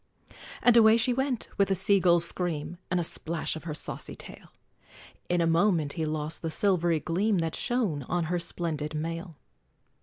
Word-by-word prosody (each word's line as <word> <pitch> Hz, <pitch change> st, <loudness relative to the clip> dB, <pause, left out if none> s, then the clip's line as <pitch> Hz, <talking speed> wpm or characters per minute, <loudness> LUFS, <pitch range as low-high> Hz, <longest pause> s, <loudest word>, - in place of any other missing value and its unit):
And 245 Hz, -1 st, +5 dB
away 220 Hz, -1 st, +7 dB
she 235 Hz, +2 st, +2 dB
went, 265 Hz, -1 st, -2 dB
with 200 Hz, -1 st, +3 dB
a 195 Hz, -, +2 dB
sea 195 Hz, +2 st, +5 dB
gull's 170 Hz, -2 st, +3 dB
scream, 170 Hz, -1 st, -3 dB
And 180 Hz, -, 0 dB
a -, -, 0 dB
splash 165 Hz, 0 st, -2 dB
of 160 Hz, -, -9 dB
her 155 Hz, -3 st, -4 dB
saucy 145 Hz, -, -1 dB
tail; -, -, -11 dB, 0.8 s
In 175 Hz, -1 st, +1 dB
a -, -, +2 dB
moment 165 Hz, -3 st, +2 dB
he 160 Hz, -2 st, -2 dB
lost 155 Hz, 0 st, -3 dB
the 165 Hz, -, -3 dB
silvery 175 Hz, -2 st, +1 dB
gleam 195 Hz, +6 st, 0 dB
That 165 Hz, -2 st, -1 dB
shone 225 Hz, -, -1 dB
on 175 Hz, -1 st, 0 dB
her 175 Hz, +2 st, -1 dB
splended 155 Hz, -3 st, -3 dB
mail! 165 Hz, +1 st, -5 dB
170 Hz, 180 wpm, -27 LUFS, 160-195 Hz, 0.8 s, away